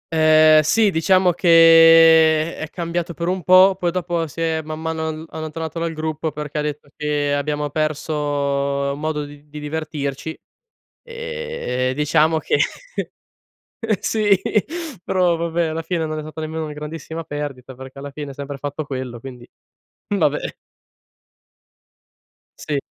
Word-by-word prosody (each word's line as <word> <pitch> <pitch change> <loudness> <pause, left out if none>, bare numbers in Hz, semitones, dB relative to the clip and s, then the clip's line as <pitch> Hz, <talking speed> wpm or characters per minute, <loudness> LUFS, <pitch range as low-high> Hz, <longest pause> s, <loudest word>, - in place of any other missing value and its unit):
Ehm, 155 -1 +6
sì 210 +7 +3
diciamo 185 +2 +3
che 165 -1 +6
è 155 - -5
cambiato 170 0 -4
per 170 +3 -3
un 185 0 -1
po', 185 +2 +6
poi 175 - +1
dopo 170 -2 -2
si 160 +3 -8
è, 160 -1 0
man 155 0 -7
mano, 160 0 -3
all 160 0 -5
allontanato 160 +1 -5
dal 165 0 -2
gruppo 155 0 -3
perché 150 0 -6
ha - - 0
detto 150 -1 -5
che 145 -1 -1
abbiamo 145 +1 -1
perso 155 0 -2 0.8
modo 150 0 -3
di 145 0 -13
d 150 - -30
di 150 0 -8
divertirci. 150 -1 -4 0.6
Ehm, 475 - -4
e - - -1
diciamo 150 +3 +2
che - - 0 1.4
sì 205 -4 +2 0.6
però 180 -2 +2
vabbè 170 0 -1
alla 160 +1 -3
fine 165 -1 -2
non 155 0 -4
è 155 - -4
stata 155 +1 -8
nemmeno 160 +1 -4
una 150 - -6
grandissima 160 +2 -7
perdita, 140 -4 -6
perché 130 +1 -11
alla 140 0 -8
fine 145 0 -7
ha 135 - -9
sempre 140 0 -7
fatto 145 +2 -4
quello, 130 -3 -5
quindi 125 0 -11 0.6
vabbè. 155 -8 +2 2.2
Sì. 145 -2 -2
155 Hz, 145 wpm, -20 LUFS, 150-165 Hz, 2.2 s, Ehm